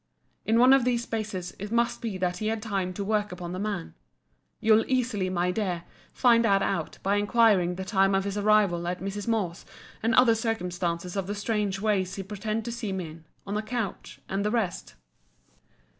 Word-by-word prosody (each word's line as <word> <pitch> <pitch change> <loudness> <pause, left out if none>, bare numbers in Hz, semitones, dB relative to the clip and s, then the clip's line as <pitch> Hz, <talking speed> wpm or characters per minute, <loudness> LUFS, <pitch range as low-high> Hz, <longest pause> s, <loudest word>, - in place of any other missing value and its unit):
In 225 - +3
one 250 +3 +7
of 270 -2 +5
these 240 -1 +1
spaces 215 -6 -4
it 205 +2 -6
must 235 0 +1
be 220 -5 -3
that 180 -1 -1
he 215 - -2
had 225 0 0
time 200 -4 -2
to 200 - -4
work 210 0 0
upon 175 -1 -6
the 185 - -4
man. 200 -4 -3 0.7
You'll 220 0 +5
easily, 240 -7 0
my 180 0 0
dear, 180 -4 -2 0.3
find 235 -2 +4
that 195 -3 +3
out, 170 -6 -2
by 200 +1 +2
inquiring 205 -4 +3
the 190 +1 -5
time 195 -1 +3
of 195 - +2
his 200 0 -3
arrival 205 -5 +3
at 180 +1 -2
Mrs. 195 +2 -5
Moore's 200 -6 -1 0.4
and 225 0 +2
other 250 -2 +6
circumstances 180 -6 -2
of 195 -2 -2
the 205 - -3
strange 205 -2 -1
way 205 -2 +2
he 195 +1 -6
pretended 215 +3 -3
to 235 - -3
see 230 -3 -4
me 185 -4 -3
in, 160 0 -14 0.2
on 200 +1 -3
a - - 0
couch, 220 -2 -4
and 195 +1 -1
the 210 - +1
rest. 215 -6 -2
205 Hz, 200 wpm, -27 LUFS, 185-225 Hz, 0.7 s, one